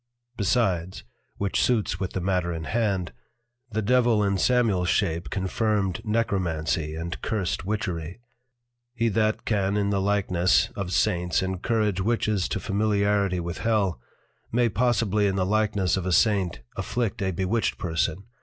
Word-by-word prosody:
Besides, 95 -5 0 0.3
(which 100 -1 0
suits 110 -8 +1
with 95 -2 -3
the 95 - -2
matter 90 -1 0
in 80 -1 -4
hand) 100 - -1 0.6
the 110 -1 -2
Devil 120 -1 +3
in 100 -1 +1
Samuels 110 -8 +2
shape 85 -4 0
confirmed 100 +1 -1
Necromancy 85 -8 -1
and 85 +2 -5
Cursed 95 -5 -2
Witchery. 90 -3 -3 0.8
He 115 -1 +1
that 110 +1 0
can 100 -2 +1
in 100 0 +1
the 100 -1 +1
likeness 95 -3 +2
of 95 -3 -4
Saints 90 -3 +1
encourage 95 +1 0
Witches 110 -2 0
to - - -2
Familiarity 100 -2 +1
with 85 +1 -4
Hell, 100 - 0 0.5
may 120 0 +2
possibly 105 -3 +1
in 95 - 0
the 95 -1 +1
likeness 105 -3 +1
of 95 -1 -3
a - - 0
Saint 100 -3 +2
afflict 120 -2 -2
a 95 - +1
Bewitched 95 +5 -1
Person. 85 +1 -1
100 Hz, 145 wpm, -25 LUFS, 90-110 Hz, 0.8 s, Devil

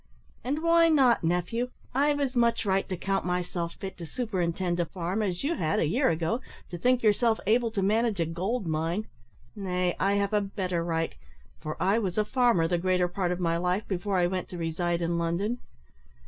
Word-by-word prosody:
"And 290 +6 -2
why 335 0 +5
not, 265 - +4
nephew? 180 +9 0 0.2
I've 290 +2 +2
as 275 -3 0
much 235 -2 +2
right 195 -1 +1
to 185 - -2
count 195 +2 -1
myself 180 -1 -2
fit 190 -1 -7
to 170 - -6
superintend 180 -5 -1
a 175 - +2
farm, 180 +5 -2
as 185 -1 -2
you 300 +4 +1
had, 160 - 0
a - - +2
year 245 - +2
ago, 165 +9 0 0.3
to 175 - -4
think 250 +4 +2
yourself 220 +1 +3
able 230 +3 +3
to 210 -3 -2
manage 215 0 +1
a 165 - +2
gold 190 +8 -2
mine. 165 +6 -1 0.5
Nay, 180 -3 -1
I 195 +1 +2
have 200 +1 0
a 210 - +3
better 185 -4 -2
right 165 -1 -1 0.5
for 155 0 -5
I 195 +5 +3
was 190 -4 -3
a 210 - +3
farmer 235 -9 +3
the 175 0 0
greater 180 0 +2
part 180 0 -1
of 180 - -2
my 170 -2 +1
life 180 +4 -1
before 195 +1 -1
I 175 - +3
went 185 +1 -2
to 180 - -7
reside 170 +1 -1
in 170 0 0
London. 185 +8 -1
190 Hz, 205 wpm, -28 LUFS, 175-225 Hz, 0.5 s, why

